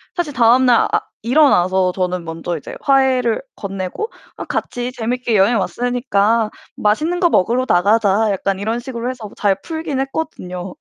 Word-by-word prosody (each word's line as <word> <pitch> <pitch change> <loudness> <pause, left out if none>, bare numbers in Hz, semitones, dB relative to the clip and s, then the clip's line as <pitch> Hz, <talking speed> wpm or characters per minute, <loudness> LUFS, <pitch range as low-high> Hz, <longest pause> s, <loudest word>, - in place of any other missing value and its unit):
사실 345 -4 -2
다음 245 +1 +4
날 240 -2 +4
아 - - +4 0.2
일어나서 190 - +3
저는 180 -1 -2
먼저 165 +1 -4
이제 150 - -9
화해를 260 -4 +2
건네고 195 - -4 0.3
'아 - - -6
같이 245 0 -3
재밌게 240 0 -1
여행 205 +4 +4
왔으니까 230 +1 0 0.3
맛있는 305 +12 0
거 350 -2 +4
먹으러 245 - +2
나가자.' 205 +3 +3
약간 195 0 -1
이런 225 +3 -2
식으로 240 -1 -5
해서 235 -5 -7
잘 195 -2 +1
풀긴 315 -4 -4
했거든요. 195 - -4
230 Hz, 335 characters per minute, -18 LUFS, 195-255 Hz, 0.3 s, 다음